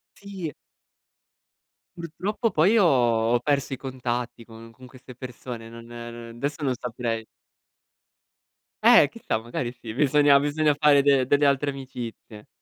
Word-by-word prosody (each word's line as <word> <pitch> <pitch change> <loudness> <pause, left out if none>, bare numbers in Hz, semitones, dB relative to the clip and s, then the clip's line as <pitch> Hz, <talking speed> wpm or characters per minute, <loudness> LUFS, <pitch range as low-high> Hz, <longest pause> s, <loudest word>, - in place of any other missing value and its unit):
Sì. 195 -6 -7 1.4
Purtroppo 190 +7 -3
poi 180 +8 +3
io 225 - +5
ho 120 -7 +2
ho 120 - +2
perso 140 +1 -1
i 135 - -3
contatti 125 -2 -4
con 115 0 -13
con 130 +3 -16
queste 125 0 -14
persone, 125 -2 -8
non 115 0 -12
ehm, 120 0 -9
adesso 145 +4 -4
non 135 -3 0
saprei. 115 -2 -4 1.6
Eh, - - +7
chissà, 110 - -3
magari 120 +1 -4
sì, 120 -3 -9
bisogna 145 +1 +4
bisogna 145 +1 +1
fare 145 -1 +5
de 140 -2 +3
delle 145 +2 +2
altre 140 +1 +2
amicizie. 120 -5 -9
130 Hz, 140 wpm, -25 LUFS, 120-145 Hz, 1.6 s, Eh